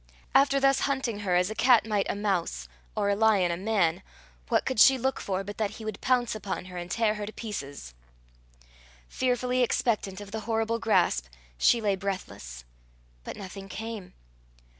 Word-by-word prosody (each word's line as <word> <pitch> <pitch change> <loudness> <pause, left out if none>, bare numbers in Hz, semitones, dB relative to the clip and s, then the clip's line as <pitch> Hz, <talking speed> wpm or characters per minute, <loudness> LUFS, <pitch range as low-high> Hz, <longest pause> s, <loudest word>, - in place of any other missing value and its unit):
After 275 0 +5
thus 275 0 +4
hunting 265 -6 -1
her 190 -4 0
as 180 +3 +2
a - - -2
cat 245 0 +5
might 210 -3 0
a - - -1
mouse, 180 - -1 0.3
or 200 - +1
a - - +2
lion 205 -5 +3
a - - 0
man, 190 -3 +1 0.5
what - - +2
could 260 -4 -1
she 265 +3 +8
look 265 +2 -1
for 190 -1 -2
but 205 +2 -8
that 215 -2 +1
he 220 - -9
would 215 -2 -5
pounce 250 -2 +2
upon 205 -4 -4
her, 185 -1 -10
and 175 0 -6
tear 220 +2 +1
her 210 -1 -5
to - - -5
pieces? 145 - -7 1.1
Fearfully 250 - 0
expectant 230 -6 0
of 205 -1 -9
the 220 - -3
horrible 225 +1 0
grasp, 180 - +2 0.3
she 230 - +3
lay 205 -2 +1
breathless. 185 - -6 0.6
But - - -7
nothing 195 0 -8
came. 220 -1 -7
210 Hz, 180 wpm, -28 LUFS, 185-230 Hz, 1.1 s, she